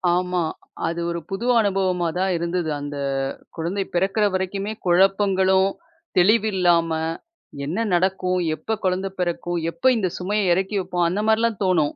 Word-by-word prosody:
ஆமா. 180 0 0 0.5
அது 170 +1 -2
ஒரு 170 0 -2
புது 195 +4 -4
அனுபவமா 190 -4 +1
தான் 190 0 +1
இருந்தது. 170 0 -2
அந்த 145 0 -6 0.6
குழந்தை 175 +5 -2
பிறக்குற 195 +4 +2
வரைக்குமே 195 +2 -2
குழப்பங்களும், 190 +1 +3 0.5
தெளிவில்லாம, 180 -4 +3 0.8
என்ன 185 +10 -1
நடக்கும்? 185 0 +1 0.2
எப்ப 220 +8 -3
குழந்த 185 +1 0
பெறக்கும்? 175 -1 -1
எப்ப 255 - -26
இந்த 190 -5 0
சுமைய 195 +1 0
எறக்கி 195 +3 -1
வப்போம்? 175 -1 0
அந்த 185 +4 -1
மாரிலாம் 220 -1 +2
தோணும். 165 -6 +2
185 Hz, 130 wpm, -23 LUFS, 175-195 Hz, 0.8 s, குழப்பங்களும்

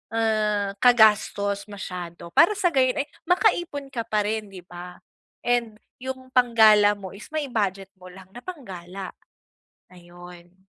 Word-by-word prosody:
ah, 215 -3 0
kagastos 210 -4 +3
masyado 180 -4 -8
para 380 - +5
sa 355 -3 +1
gayo'n 265 +1 +2
ay 290 - -22 0.2
makaipon 345 -7 +1
ka 235 -3 -4
pa 210 -1 +1
rin, 215 0 -3
'di 190 -2 -12
ba? 180 0 -10 0.5
And 240 -3 0 0.3
'yong 260 0 -7
panggala 220 -4 +5
mo 195 -2 -9
is 200 +2 -11
mai-budget 210 -11 -2
mo 185 - -13
lang 190 +1 -14
na 240 - -10
pang-gala, 195 - -8 0.8
ayon. 175 +1 -15
210 Hz, 135 wpm, -24 LUFS, 190-250 Hz, 0.8 s, para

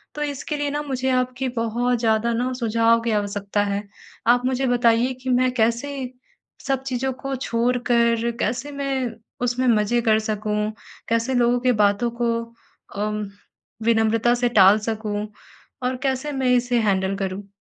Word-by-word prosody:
तो 295 - -5
इसके 290 +1 -3
लिए 290 0 -1
ना, 295 0 -2
मुझे 265 -2 -2
आपकी 255 +1 0
बहुत 240 +2 0
ज़्यादा 225 0 +1
ना, 250 +2 -1
सुझाव 230 -1 +2
की 230 - -1
आवश्यकता 205 -1 -1
है। 200 0 -2 0.4
आप 245 +1 +4
मुझे 260 0 0
बताइए 240 +1 +3
कि 260 - -3
मैं 255 0 +3
कैसे 235 +4 +1 0.8
सब 270 -1 0
चीज़ों 265 0 -2
को 270 +1 -5
छोड़कर 235 -1 +1
कैसे 250 +6 -2
मैं 270 -3 -2 0.4
उसमें 250 +1 0
मज़े 230 +1 +2
कर 220 -2 +3
सकूँ, 215 0 -2 0.4
कैसे 230 +3 +1
लोगों 245 0 +3
की 250 0 +2
बातों 205 +4 +2
को 235 -1 +2 0.7
अम 210 0 -1 0.6
विनम्रता 230 +1 +3
से 245 0 +1
टाल 205 -1 +6
सकूँ? 215 -1 -3 0.6
और 255 0 -1
कैसे 270 +2 -1
मैं 265 -2 0
इसे 245 0 +1
हैंडल 195 -2 +1
करूँ? 195 0 -4
235 Hz, 155 wpm, -23 LUFS, 220-255 Hz, 0.8 s, टाल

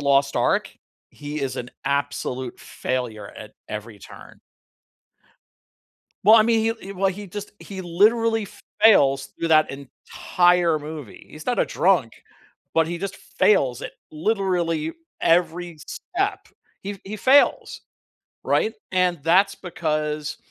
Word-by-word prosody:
Lost 140 0 +2
Ark, - - +1 0.4
he 150 +1 -6
is 130 -1 -3
an 125 0 -5
absolute 140 -3 -2
failure 125 -4 -4
at - - -11 0.2
every 105 0 -7
turn. - - -14 1.8
Well, 215 +3 +8
I 220 - +6
mean, 225 0 +3
he 225 - +1
l 225 - -2
he 195 - -9
well, 195 +1 +1
he 200 +1 -9
just 205 +3 -7
he 190 -2 -8
literally 220 +5 +2 0.4
fails 135 -11 +5
through 165 - -4
that 155 -1 +4
entire 170 +5 +1
movie. 150 -5 -9
He's 155 - -11
not 245 - 0
a - - +3
drunk, 165 - +2 0.6
but 165 -1 +3
he 170 +1 -3
just 195 0 -4
fails 130 - +1
at - - -6 0.2
literally 170 -3 -1 0.3
every 175 0 +1
step. 390 +3 -3 0.3
He 200 - -4
f 200 - -10
he 210 +2 -6
fails, 270 +6 +3 0.6
right? 220 - +1 0.2
And 180 -4 +1
that's 190 +5 +4
because 155 -3 -3
170 Hz, 135 wpm, -23 LUFS, 145-200 Hz, 1.8 s, Well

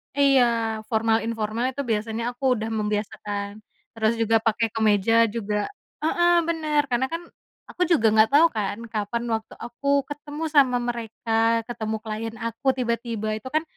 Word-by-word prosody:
Iya, 275 -2 +5 0.5
formal 225 0 +2
informal 225 +1 -2
itu 280 - -2
biasanya 220 +1 -1
aku 245 +3 -17
udah 220 -1 -3
membiasakan. 205 -1 -3 0.4
Terus 220 0 +1
juga 225 0 +2
pakai 225 +1 +2
kemeja 215 -1 +2 0.2
juga 210 -2 -2 0.5
heeh, 345 +2 +3 0.2
bener, 310 -3 +1
karena 245 +2 +2
kan 335 - -2 0.5
aku 360 - -9
juga 270 -10 +4
nggak 220 0 +6
tau 295 +4 +7
kan 205 -1 -1 0.2
kapan 215 +2 -2
waktu 220 0 -7
aku 240 +4 -8 0.2
ketemu 295 +1 -6
sama 260 -4 +5
mereka 230 -1 -5 0.4
ketemu 220 -2 -3
client 225 +1 -5
aku 230 +4 -6
tiba-tiba, 235 -3 -2
itu 220 - -9
kan 310 - +2
230 Hz, 150 wpm, -24 LUFS, 220-260 Hz, 0.5 s, tau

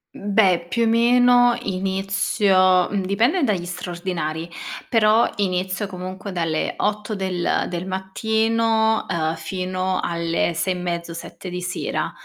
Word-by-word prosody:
Mhmm, 205 0 -5
beh, 185 -5 +4
più 235 +4 +1
o - - +3
meno 245 +1 +5
inizio 190 -1 +2
mhmm, 200 -2 -1
dipende 235 - +1
dagli 190 -8 0
straordinari, 170 -2 -4 0.4
però 220 0 +4
inizio 185 +1 -1
comunque 185 +1 -7
dalle 165 -3 -1
8 210 +1 -1
del 185 -3 -1
del 175 +1 -4
mattino, 220 +3 +1
ehm, 165 -2 0
fino 185 +1 -2
alle 170 0 -1
6 185 +3 0
e - - -5
mezzo, 170 -1 -4
7 180 +2 -8
di 180 0 -5
sera. 180 +1 -3
190 Hz, 130 wpm, -22 LUFS, 180-215 Hz, 0.4 s, meno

